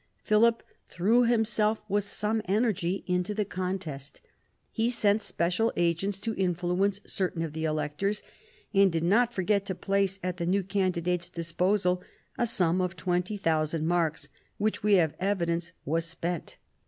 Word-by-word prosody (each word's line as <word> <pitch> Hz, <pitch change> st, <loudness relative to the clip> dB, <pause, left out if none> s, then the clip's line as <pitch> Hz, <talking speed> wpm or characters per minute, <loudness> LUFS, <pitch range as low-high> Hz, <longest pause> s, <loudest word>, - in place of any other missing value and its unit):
Philip 230 Hz, +2 st, +3 dB, 0.3 s
threw 225 Hz, +7 st, +3 dB
himself 220 Hz, -2 st, +2 dB
with 205 Hz, 0 st, 0 dB
some 215 Hz, +2 st, -1 dB
energy 195 Hz, -3 st, 0 dB
into 180 Hz, +3 st, -1 dB
the 210 Hz, -1 st, 0 dB
contest. 180 Hz, -7 st, -5 dB, 0.5 s
He 225 Hz, +1 st, +1 dB
sent 215 Hz, -3 st, +2 dB
special 180 Hz, +4 st, 0 dB
agents 175 Hz, +3 st, 0 dB
to 225 Hz, 0 st, -2 dB
influence 185 Hz, +1 st, 0 dB
certain 180 Hz, -3 st, -1 dB
of 160 Hz, -3 st, -4 dB
the 160 Hz, 0 st, -3 dB
electors, 155 Hz, +7 st, -1 dB, 0.5 s
and 195 Hz, -1 st, +5 dB
did 165 Hz, -1 st, -1 dB
not 230 Hz, +7 st, +3 dB
forget 200 Hz, -1 st, +1 dB
to 190 Hz, -, -2 dB
place 195 Hz, 0 st, 0 dB
at 180 Hz, -1 st, -2 dB
the 170 Hz, -1 st, -2 dB
new 195 Hz, +2 st, +2 dB
candidate's 180 Hz, -2 st, -1 dB
disposal 180 Hz, +2 st, 0 dB, 0.3 s
a 240 Hz, -, +1 dB
sum 185 Hz, -5 st, +2 dB
of 180 Hz, 0 st, -2 dB
20,000 165 Hz, -3 st, 0 dB
marks, 165 Hz, -2 st, 0 dB, 0.3 s
which 215 Hz, +1 st, 0 dB
we 210 Hz, 0 st, +3 dB
have 160 Hz, -5 st, +3 dB
evidence 170 Hz, -3 st, -1 dB
was 165 Hz, +3 st, 0 dB
spent. 170 Hz, +1 st, -4 dB
185 Hz, 145 wpm, -28 LUFS, 170-205 Hz, 0.5 s, and